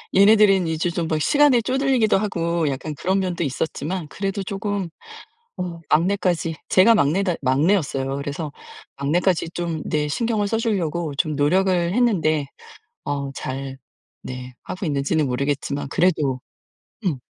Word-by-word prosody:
얘네들은 200 -3 +6
이제 160 +2 -1
좀 170 -1 -2
막 155 -1 -1
시간에 285 - +4
쪼들리기도 255 -4 +2
하고 170 -5 -1
약간 145 +2 -4
그런 190 +6 0
면도 180 -3 -1
있었지만 155 +4 -3
그래도 195 +3 -3
쪼금 200 -2 -3 0.7
어 175 -2 -4
막내까지 175 -1 +1
제가 225 +5 +6
막내다 180 +2 +2
막내였어요. 135 -1 +1
그래서 145 +2 -4 0.5
막내까지 170 +4 +1
좀 170 -3 -3
네 150 -1 0
신경을 215 +5 0
써 225 - 0
주려고 175 - -1
좀 155 0 0
노력을 185 +7 +3 0.2
했는데 160 - +2 0.6
어 140 -1 -2
잘 135 0 -5 0.4
네 125 0 -7
하고 185 - -5
있는지는 145 0 0
모르겠지만 140 +2 -2
그래도 150 -6 +1 0.7
음. 160 - +1
170 Hz, 310 characters per minute, -22 LUFS, 145-195 Hz, 0.7 s, 얘네들은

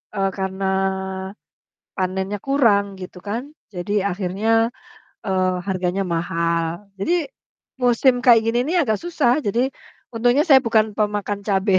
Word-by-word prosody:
eee, 195 -1 +1
karena 190 0 -3 1.3
panennya 190 +2 -2
kurang 230 -8 +3 0.2
gitu 180 0 -9
kan. 225 +4 -2 0.3
Jadi 180 +3 -5
akhirnya, 195 +3 -2 0.8
eee, 185 -1 +1
harganya 185 0 -1
mahal. 170 +2 -2
Jadi 335 - 0 0.7
musim 245 +1 +3
kayak 230 -2 +7
gini 235 +1 +1
nih 350 - 0
agak 220 -4 0
susah. 300 -6 +2
Jadi 245 +6 +1 0.4
untungnya 245 +6 +3
saya 270 -3 +8
bukan 220 -2 +2
pemakan 205 -1 -1
cabe. 195 0 +2
205 Hz, 120 wpm, -21 LUFS, 190-240 Hz, 1.3 s, saya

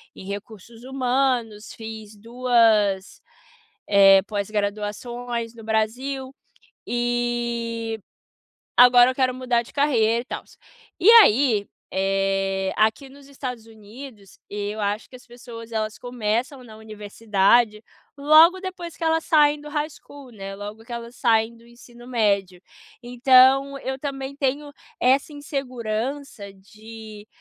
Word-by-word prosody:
em - - -11
recursos 215 +3 -9
humanos, 250 -4 -1
fiz 220 -1 -9
2, 225 -4 +1 0.7
eh, 195 -1 +6
pós-graduações 215 +3 -4
no 225 - -12
Brasil, 255 +5 -2 0.6
e 235 -2 -2 0.8
agora 245 0 +7
eu - - -10
quero 255 -1 +1
mudar 250 -2 0
de - - -17
carreira, 235 -6 +2
e - - -14
tals. - - -9 0.4
E 380 +5 +5
aí, 220 -3 +2 0.2
eh, 195 0 -1
aqui 220 +6 +1
nos 280 0 -16
Estados 250 -4 -7
Unidos, 220 -1 -13
eu 205 +1 -5
acho 205 +2 -3
que - - -13
as 250 - -21
pessoas 235 -1 -11
elas 215 -1 -3
começam 245 +2 -3
na 220 -3 -13
universidade 215 +1 0 0.3
logo 315 +6 +6
depois 360 -3 -7
que - - -6
elas 325 0 +1
saem 295 -2 +3
do 300 - -11
High 300 0 -2
School, 280 -3 -14
né, 195 -2 -8
logo 210 +3 -9
que 240 - -9
elas 235 +1 -8
saem 230 -1 +1
do 235 - -20
ensino 240 0 -16
médio, 200 -6 0 0.4
então 260 +3 +4
eu 265 0 -5
também 270 -1 -5
tenho 285 +1 -2 0.3
essa 270 +4 +2
insegurança 255 -5 -5
de, 215 +2 -13
235 Hz, 125 wpm, -23 LUFS, 215-260 Hz, 0.8 s, agora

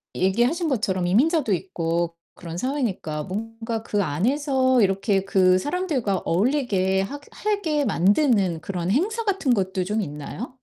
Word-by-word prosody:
얘기하신 240 - +1
것처럼 190 -8 0
이민자도 255 - +2
있고 170 -2 -2 0.2
그런 170 0 -8
사회니까 205 - -2
뭔가 225 +4 -5
그 205 -2 0
안에서 260 - +1
이렇게 195 0 +1
그 185 -2 +4
사람들과 290 - -1
어울리게 190 - +1
하게 285 +8 -6 0.2
해게 315 -9 0
만드는 200 - +2
그런 180 -2 -3
행사 430 - 0
같은 380 - +1
것도 190 -2 0
좀 210 +4 -1
있나요? 150 - -6
210 Hz, 315 characters per minute, -24 LUFS, 185-275 Hz, 0.2 s, 그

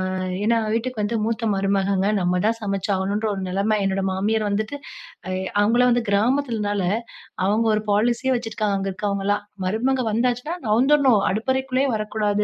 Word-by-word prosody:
ஆ - - -2 0.3
ஏன்னா, 230 +1 +3
வீட்டுக்கு 230 0 -2
வந்து 230 +2 -1
மூத்த 225 0 -1
மருமகங்க. 195 0 +1
நம்ம 180 0 +1
தான் 230 +1 +1
சமச்சு 200 -1 -2
ஆகணுன்ற 200 +3 -1
ஒரு 195 - -4
நிலம 200 +3 +1
என்னோட 195 0 0
மாமியார் 210 +3 0
வந்துட்டு, 215 +7 -2 0.5
அ 185 - -3 0.3
அவுங்கள்லாம் 240 +4 +4
வந்து 240 -1 0
கிராமத்திலனால 215 -2 +1 0.6
அவுங்க 220 +3 +2
ஒரு 215 - -2
பாலிசியே 235 +5 +2
வச்சிருக்காங்க. 215 -3 -2
அங்க 195 0 -2
இருக்கவங்கலாம். 200 +1 -1 0.2
மருமக 255 +6 0
வந்தாச்சுனா 245 +7 0
நவுந்துர்ணும் 255 0 +4
அடுப்பறைக்குள்ளே 260 +4 0
வரக்கூடாது 210 -1 -1
215 Hz, 145 wpm, -22 LUFS, 200-240 Hz, 0.6 s, அவுங்கள்லாம்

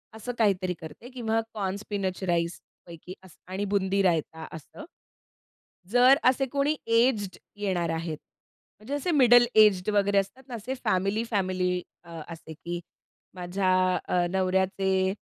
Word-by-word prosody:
असं 245 +3 -5
काहीतरी 190 -4 +1
करते 160 +10 -10
किंवा 225 -3 -1
कॉर्न 195 -3 -2
स्पिनच 200 -2 -4
राईस 170 0 0 0.3
पैकी 170 +1 -10
असं 185 0 -17
आणि 195 +2 -2
बुंदी-रायता 190 -5 0
असं. 160 - -10 1.1
जर 250 +3 +6
असे 260 +2 +3
कोणी 285 +2 +1
एज्ड 230 -4 +2 0.2
येणार 185 -5 -1
आहेत. 165 -1 -3 0.6
म्हणजे 230 +7 -7
असे 315 +5 -1
मिडल 245 -4 +6
एज्ड 210 -3 +5
वगैरे 200 0 +2
असतात 195 +7 -1
ना, 245 - -6
असे 230 +4 -5
फॅमिली-फॅमिली 185 -2 0 0.2
अ, 170 -2 -9
असे, 165 -1 -9
की 175 +3 -6 0.6
माझ्या 185 +1 -1 0.4
अ, 175 -1 +2
नवऱ्याचे 190 0 +1
195 Hz, 130 wpm, -27 LUFS, 180-225 Hz, 1.1 s, जर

